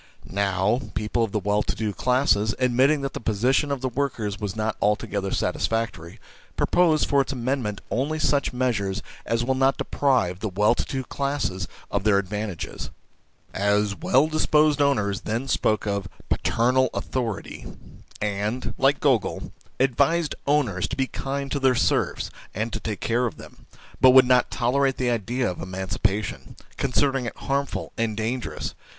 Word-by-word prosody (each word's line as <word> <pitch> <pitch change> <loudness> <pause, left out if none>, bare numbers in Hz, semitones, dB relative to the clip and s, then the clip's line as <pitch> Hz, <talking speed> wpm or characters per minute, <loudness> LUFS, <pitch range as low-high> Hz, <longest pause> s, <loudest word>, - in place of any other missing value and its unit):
Now, 100 +4 +1
people 105 +3 0
of 110 - -2
the 105 - 0
well 105 +1 +1
to - - -2
do 110 -2 -2
classes, 110 -1 +2
admitting 130 +4 +3
that 135 -1 -3
the - - -4
position 120 +7 +1
of 140 -3 -2
the 130 - 0
workers 120 -6 -2
is 105 -1 -3
not 110 0 -1
altogether 100 -1 0
satisfactory, 115 -6 -2 0.4
propose 165 -4 +3
for 140 -1 +3
its 135 - -3
amendment 125 -4 -2
only 140 +6 0
such 145 -2 +1
measures 115 -6 -1 0.2
as 115 0 +1
will 130 +2 +1
not 135 +1 +2
deprive 120 -11 +1
the 110 - -2
well 105 +4 +3
to - - -1
do 130 -1 -3
classes 140 -11 -2 0.2
of - - -1
their 105 -2 +4
advantages. 100 -3 -4 0.6
As 100 +1 +1
well 130 - +3
disposed 155 -1 +3
owners 105 -9 +1
then 115 +5 -2
spoke 110 -4 +1
of 100 -2 -2
" - - -22
paternal 130 +3 +2
authority," 115 -6 -4 0.5
and, 105 +4 -2
like 135 +2 +3
Gogol, 130 -7 +2
1 - - -9 0.3
advised 140 +5 +2
owners 125 -11 +1
to - - -4
be 135 - +2
kind 140 +1 -4
to 140 - 0
their 130 -2 +3
serfs - - 0 0.2
and 110 +3 -2
to - - -2
take 105 -2 -4
care 120 +2 +1
of 115 - -7
them, - - -14 0.3
but 130 - +8
would 130 - +9
not 125 0 +4
tolerate 135 +2 +1
the 125 -1 +1
idea 120 +3 -1
of 90 - -4
emancipation, 95 +2 -3
2 - - -18
considering 135 -1 +1
it - - -5
harmful 140 0 -2
and 110 -2 0
dangerous, 115 +3 -3
just - - -2
so, - - -23
1 - - -30
N. - - -25
120 Hz, 175 wpm, -24 LUFS, 105-135 Hz, 0.6 s, would